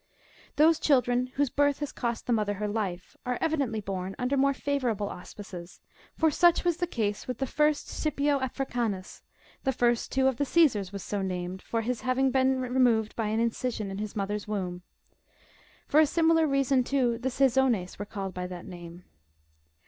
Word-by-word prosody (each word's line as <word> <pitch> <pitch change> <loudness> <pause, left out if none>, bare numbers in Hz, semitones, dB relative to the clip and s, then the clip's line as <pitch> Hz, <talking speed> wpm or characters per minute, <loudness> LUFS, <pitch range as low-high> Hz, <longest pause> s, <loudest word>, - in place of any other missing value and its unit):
Those 320 +1 +5
children, 250 -3 +2
whose 285 -2 +1
bii'th 285 -1 +2
has 290 -2 -4
cost 235 -2 -3
the 245 - +1
mother 210 -2 0
her 210 +1 -2
life, 200 -4 -3
are 250 -2 -1
evidently 280 -9 0
born 190 -1 -4
under 250 +2 0
more 275 +1 +3
favourable 245 -9 -1
auspices; 180 -1 -9 0.4
for 320 -1 +3
such 345 +3 +4
was 345 -2 +1
the 350 0 -1
case 210 -9 -2
with 250 -2 -3
the 270 - -1
first 300 +2 +1
Scipio 290 -2 0
Africanus; 240 -7 -3 0.4
the 265 - +2
first, 240 -2 +1
too, 265 0 +2
of 265 -3 +1
the 285 - +1
Caesars 260 - +3
was 200 -2 -6
so 205 -1 -2
named, 185 0 -4
from 230 -1 -2
his 245 +1 -2
having 260 +1 +1
been 260 0 +2
removed 245 -4 +2
by 225 -2 -1
an 220 +1 0
in 230 0 +2
cision 220 -5 -3
in 195 - -5
his 210 -1 -5
mother's 205 +1 -2
womb. 185 -4 -3 1.1
For 300 - +4
a 310 - +6
similar 325 0 +3
reason, 275 -2 +2
too, 245 -3 +1
the 260 +2 -1
Caesones 255 -8 +2
were 205 - -3
called 195 -2 -5
by 180 0 -4
that 180 -1 -8
name. 175 -1 -10
245 Hz, 185 wpm, -28 LUFS, 205-275 Hz, 1.1 s, a